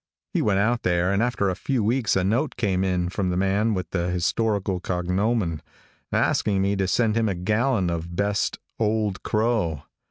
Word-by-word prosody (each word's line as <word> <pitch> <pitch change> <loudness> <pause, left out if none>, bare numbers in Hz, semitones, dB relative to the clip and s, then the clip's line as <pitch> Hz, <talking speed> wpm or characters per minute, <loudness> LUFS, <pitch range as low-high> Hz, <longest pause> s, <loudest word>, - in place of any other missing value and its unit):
He - - +1
went 100 -2 +2
out 115 +4 +1
there, 90 +1 +1
and 100 - +1
after 120 -4 +1
a 95 - 0
few 125 +3 -1
weeks 115 +1 +1
a 95 - +2
note 120 +9 0
came 95 -6 +1
in 90 -2 0
from 95 0 -1
the 90 - -1
man 100 +3 +1
with 90 -3 -4
the 85 -1 -1
historical 95 +2 0
cognomen, 90 0 -1 0.5
asking 100 -2 +1
me 100 +1 +1
to 95 -1 0
send 110 +3 +2
him 115 -2 +2
a 95 - -1
gallon 105 +1 +1
of 85 +1 -4
best 100 +1 0 0.2
Old 105 -3 0
Crow. 105 - 0
100 Hz, 185 wpm, -24 LUFS, 90-110 Hz, 0.5 s, went